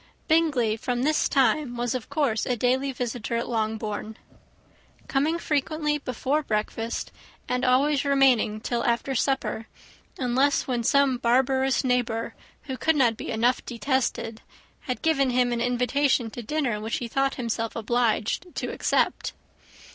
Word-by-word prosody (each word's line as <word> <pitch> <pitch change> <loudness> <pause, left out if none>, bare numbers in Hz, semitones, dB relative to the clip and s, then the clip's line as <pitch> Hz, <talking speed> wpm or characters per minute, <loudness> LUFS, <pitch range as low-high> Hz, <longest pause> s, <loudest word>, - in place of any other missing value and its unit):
Bingley, 295 -9 +2
from 245 +2 -2
this 305 +2 +2
time, 265 -1 +2
was 240 0 -1
of 255 -3 -5
course 270 -8 0
a 250 - 0
daily 260 +4 +1
visitor 245 -2 -3
at 235 - -2
Longbourn; 220 -1 -3 0.9
coming 300 +5 +1
frequently 300 -1 -1
before 275 +3 -1
breakfast, 225 -1 -3 0.4
and 250 0 -1
always 270 +3 +3
remaining 265 -6 +3
till 235 +1 -1
after 240 +3 0
supper; 245 -4 -1 0.5
unless 265 +2 +2
when 245 -2 -1
some 270 +1 +3
barbarous 260 +3 +2
neighbour, 245 -3 0 0.3
who 265 -3 -5
could 320 +5 +2
not 245 -5 +3
be - - -7
enough 235 +2 +1
detested, 240 -2 -2 0.4
had 255 - -5
given 275 -5 +3
him 245 -1 +2
an 235 - -1
invitation 245 0 +1
to 240 - -6
dinner, 240 -3 -1
which 220 +1 -2
he 240 - -4
thought 270 +3 0
himself 230 -2 -3
obliged 230 - 0
to - - -3
accept. - - 0
250 Hz, 140 wpm, -26 LUFS, 230-275 Hz, 0.9 s, always